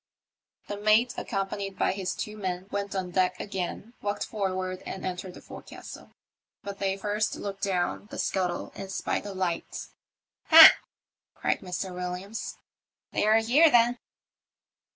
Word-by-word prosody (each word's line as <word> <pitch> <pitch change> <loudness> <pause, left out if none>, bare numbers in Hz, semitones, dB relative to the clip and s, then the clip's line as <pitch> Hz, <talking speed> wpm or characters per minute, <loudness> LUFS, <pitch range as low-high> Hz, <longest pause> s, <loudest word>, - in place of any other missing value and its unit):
The 205 - -4
mate, 215 +4 +3
accompanied 195 -1 -3
by - - +2
his 190 -1 -3
two 210 - -5
men, 185 -3 -4
went 200 0 -3
on 185 -2 -3
deck 185 0 +1
again, 200 +3 -5
walked 205 0 -2
forward 185 -3 -3
and 190 - -6
entered 180 0 -5
the - - -11
forecastle; - - -11 0.5
but 200 0 -7
they 195 0 0
first 205 +1 -1
looked 195 -1 -6
down 190 +1 -1
the - - -8
scuttle 180 -2 -1
and 195 -1 -7
spied 205 - -2
a 200 - -6
light. 180 -3 -3 0.3
" - - -66
Ha! 325 0 +12 0.3
" - - -66
cried - - 0
Mr. 185 0 -4
WilUams, 180 +4 -5 0.3
" - - -66
they're 215 +1 +4
here 280 +9 +5
then." 240 -1 +4
195 Hz, 150 wpm, -27 LUFS, 185-210 Hz, 0.5 s, Ha